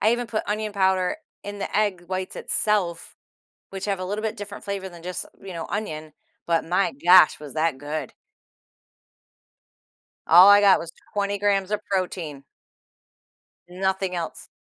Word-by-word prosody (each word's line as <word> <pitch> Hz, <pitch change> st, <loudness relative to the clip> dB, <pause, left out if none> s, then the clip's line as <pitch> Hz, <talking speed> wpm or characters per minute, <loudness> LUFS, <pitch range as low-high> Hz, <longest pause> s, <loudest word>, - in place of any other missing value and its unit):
I 220 Hz, +2 st, +4 dB
even 240 Hz, 0 st, -1 dB
put 220 Hz, -2 st, -2 dB
onion 215 Hz, 0 st, -2 dB
powder 190 Hz, 0 st, +1 dB, 0.3 s
in 205 Hz, 0 st, -7 dB
the 195 Hz, -, -5 dB
egg 200 Hz, -5 st, 0 dB
whites 185 Hz, 0 st, -4 dB
itself, 195 Hz, -6 st, -1 dB, 0.5 s
which 195 Hz, 0 st, -6 dB
have 200 Hz, -2 st, -1 dB
a 185 Hz, -, -3 dB
little 205 Hz, +3 st, -3 dB
bit 220 Hz, -1 st, -2 dB
different 205 Hz, 0 st, -8 dB
flavor 195 Hz, -1 st, -4 dB
than 170 Hz, -1 st, -13 dB
just, 180 Hz, -1 st, -4 dB, 0.2 s
you 190 Hz, -2 st, -8 dB
know, 165 Hz, -1 st, -5 dB
onion. 155 Hz, -7 st, -4 dB, 0.3 s
But, 165 Hz, -1 st, +1 dB
my 180 Hz, +3 st, +1 dB
gosh, 180 Hz, -2 st, +7 dB
was 150 Hz, -2 st, -9 dB
that 155 Hz, -3 st, 0 dB
good. 150 Hz, +2 st, -5 dB, 2.1 s
All 180 Hz, +4 st, +9 dB
I 205 Hz, 0 st, +8 dB
got 200 Hz, -2 st, +6 dB
was 165 Hz, 0 st, -7 dB, 0.2 s
20 200 Hz, 0 st, -1 dB
grams 200 Hz, -1 st, +1 dB
of 210 Hz, 0 st, -1 dB
protein. 170 Hz, -7 st, -3 dB, 1.2 s
Nothing 190 Hz, 0 st, -1 dB
else. 170 Hz, -2 st, -5 dB
190 Hz, 155 wpm, -24 LUFS, 170-205 Hz, 2.1 s, All